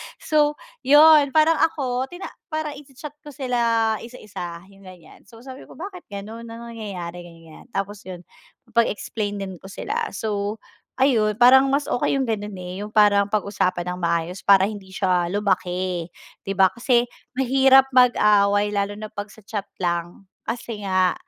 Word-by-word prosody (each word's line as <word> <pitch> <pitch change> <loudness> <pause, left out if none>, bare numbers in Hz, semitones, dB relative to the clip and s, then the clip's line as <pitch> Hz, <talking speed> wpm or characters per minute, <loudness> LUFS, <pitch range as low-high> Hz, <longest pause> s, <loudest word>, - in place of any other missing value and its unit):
So, 300 -1 +1 0.2
'yun 295 0 +6
parang 315 +1 +4
ako 260 -5 0
tina 355 +2 -8 0.2
parang 310 -2 -3
i-cha-chat 295 +1 -12
ko 295 - -12
sila 230 -5 0
isa-isa 185 -8 -8
yung 195 0 -19
ganiyan, 180 -4 -16
so 230 0 -15
sabi 260 0 -10
ko, - - -14
"Bakit 365 0 -9
gano'n, 220 +4 -8
anong 230 +1 -9
nangyayari?" 175 -5 -6
Ganiyan, 165 +3 -14
tapos 200 +1 -3
'yun 180 -1 -8 0.5
pag-explainin 205 -4 -2
ko 190 - -11
sila, 445 - -3
so 210 0 -3 0.4
ayun 220 -6 +3
parang 265 +2 +6
mas 280 +1 +1
okey 275 - 0
'yung 265 - 0
gano'n, 210 -3 -3
eh, 180 +2 -7
'yung 210 - -6
parang 205 -1 +4
pag-usapan 185 -4 -1
ng 180 - -8
maayos 170 +2 -1
para 195 -1 +5
hindi 205 -2 -7
siya 180 -3 +1
lumaki, 185 -3 -1 0.4
'di 195 - -2
ba? 190 -1 +6
Kasi 240 0 +2 0.3
mahirap 265 +1 +5
mag-away 210 -4 +4
lalo 200 0 -1
na 215 - -6
pag 205 0 -7
sa 220 - -16
chat 205 -3 -4 0.2
lang, 175 +2 -3 0.2
kasi 230 -2 -5
nga 185 -1 +2
210 Hz, 155 wpm, -22 LUFS, 190-255 Hz, 0.5 s, yun